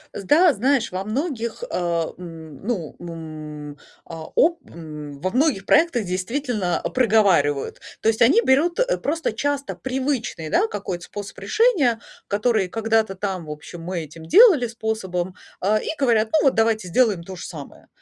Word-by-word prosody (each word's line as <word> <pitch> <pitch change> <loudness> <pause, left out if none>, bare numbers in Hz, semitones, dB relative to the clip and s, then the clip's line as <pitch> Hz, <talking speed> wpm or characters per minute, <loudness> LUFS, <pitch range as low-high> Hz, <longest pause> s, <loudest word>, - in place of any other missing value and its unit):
С 200 - -5
да, 320 - +5
знаешь, 245 -2 +1
во 185 - -2
многих, 235 - -3
э, - - -2 0.4
м, 165 -3 -10
ну, 195 -10 -3
м, 155 -3 -8 0.3
а, 165 -1 -8
о 335 +1 +3
м, 150 -3 -9
во 185 +5 -1
многих 255 -6 +1
проектах, 290 - +3
действительно, 195 +1 -2
проговаривают. 195 - +2 0.2
То - - 0
есть, 225 0 +1
они 280 - +6
берут, 335 - +2
э, - - +2
просто 320 -4 -2
часто 285 +4 -2
привычный, 260 - -3
да, 225 - +2
какой-то 190 -4 -5
способ 205 +2 -8
решения, 325 - +2 0.3
который 210 -2 +1
когда-то 225 -1 0
там 190 -3 -3
в 150 - -7
общем 160 +3 -9
мы 175 -1 -4
этим 160 +2 -12
делали 355 - +6
способом, 190 -6 -3 0.2
а, 210 +3 +2
и - - -5
говорят: 230 -5 +2
Ну, 315 - +4
вот 270 - +3
давайте 220 -4 +1
сделаем 210 -2 +2
то 185 +1 -8
же - - -8
самое. 145 -5 -10
215 Hz, 160 wpm, -22 LUFS, 175-260 Hz, 0.4 s, они